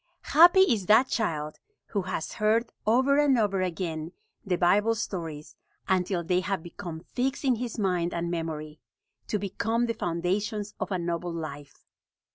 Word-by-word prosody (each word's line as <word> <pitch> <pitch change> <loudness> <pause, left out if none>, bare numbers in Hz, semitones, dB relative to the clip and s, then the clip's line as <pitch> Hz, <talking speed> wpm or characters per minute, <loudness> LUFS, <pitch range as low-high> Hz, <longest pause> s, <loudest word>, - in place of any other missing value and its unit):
Happy 350 +4 +8
is 225 - +2
that 225 +5 +6
child 155 -11 -2 0.3
who 205 - -1
has 180 -3 -4
heard, 225 +2 +1 0.2
over 260 +5 +4
and 285 -3 +4
over 200 -4 +1
again, 165 -3 -3 0.3
the 190 -4 0
Bible 205 +6 +3
stories 165 -8 -5 0.3
until 185 -1 +1
they 180 +2 +1
have 185 -2 -2
become 170 -2 -7
fixed 260 - -2
in 255 -3 +3
his 240 -1 -4
mind 180 -4 0
and 170 0 -2
memory, 155 -2 -4 0.5
to 210 - 0
become 220 +4 -1
the 230 - -1
foundations 200 +3 -2
of - - -3
a 185 - +1
noble 170 0 -3
life. 150 -4 -8
190 Hz, 155 wpm, -27 LUFS, 170-225 Hz, 0.5 s, Happy